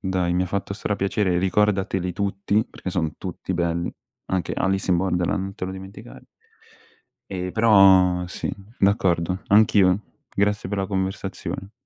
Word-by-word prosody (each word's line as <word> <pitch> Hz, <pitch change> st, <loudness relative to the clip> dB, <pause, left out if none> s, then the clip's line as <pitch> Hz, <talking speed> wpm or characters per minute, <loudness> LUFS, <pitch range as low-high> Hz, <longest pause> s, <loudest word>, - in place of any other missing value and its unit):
Dai, 90 Hz, -2 st, 0 dB
mi 90 Hz, -, +2 dB
ha -, -, -2 dB
fatto 100 Hz, +1 st, -3 dB
stra 105 Hz, 0 st, -2 dB
piacere. 95 Hz, -2 st, 0 dB
Ricordateli 95 Hz, -1 st, +1 dB
tutti, 100 Hz, +3 st, 0 dB
perché 95 Hz, -, -7 dB
son 80 Hz, -4 st, -2 dB
tutti -, -, -5 dB
belli. 85 Hz, 0 st, -1 dB, 0.3 s
Anche 95 Hz, -2 st, -2 dB
Alice 95 Hz, 0 st, 0 dB
in 90 Hz, -, +4 dB
Borderland, 90 Hz, +1 st, 0 dB
non 95 Hz, 0 st, -6 dB
te -, -, -5 dB
lo 95 Hz, -, -4 dB
dimenticare. 95 Hz, -9 st, -11 dB, 1.1 s
Ehm, 90 Hz, -1 st, -4 dB
però 95 Hz, -5 st, +5 dB
sì, 90 Hz, -, -4 dB, 0.3 s
d'accordo, 95 Hz, -2 st, +1 dB
anch'io. 100 Hz, -2 st, +5 dB, 0.4 s
Grazie 105 Hz, -1 st, +1 dB
per 100 Hz, 0 st, -2 dB
la 95 Hz, -, -1 dB
conversazione. 95 Hz, 0 st, -4 dB
95 Hz, 145 wpm, -23 LUFS, 90-100 Hz, 1.1 s, però